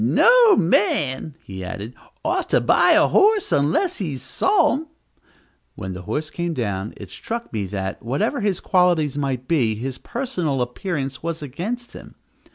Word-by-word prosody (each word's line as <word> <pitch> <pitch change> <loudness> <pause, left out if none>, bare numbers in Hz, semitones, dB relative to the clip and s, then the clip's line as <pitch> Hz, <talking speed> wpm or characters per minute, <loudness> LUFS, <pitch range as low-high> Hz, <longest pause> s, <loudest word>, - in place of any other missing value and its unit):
"No 475 -4 +6
man," 155 -6 +1
he 95 -1 -8
added, 100 +5 -6 0.3
"ought - - 0
to - - +4
buy - - +4
a - - +5
horse 420 0 +3
unless 160 - +1
he's 150 -9 -4
saw 390 0 +2
him." 310 +4 -4 0.9
When 95 0 -6
the 90 - -7
horse 150 - -4
came 170 -1 -3
down, 105 -4 -3
it - - -10
struck 235 - -6
me 105 -3 -2
that, 95 0 -4
whatever 140 - -1
his 200 -3 0
qualities 175 -6 +2
might 135 -3 -2
be, 125 -9 +2
his 130 +4 -5
personal 185 - -2
appearance 135 +1 -4
was 165 -1 -4
against 205 - -5
him. - - -12
150 Hz, 160 wpm, -22 LUFS, 120-205 Hz, 0.9 s, No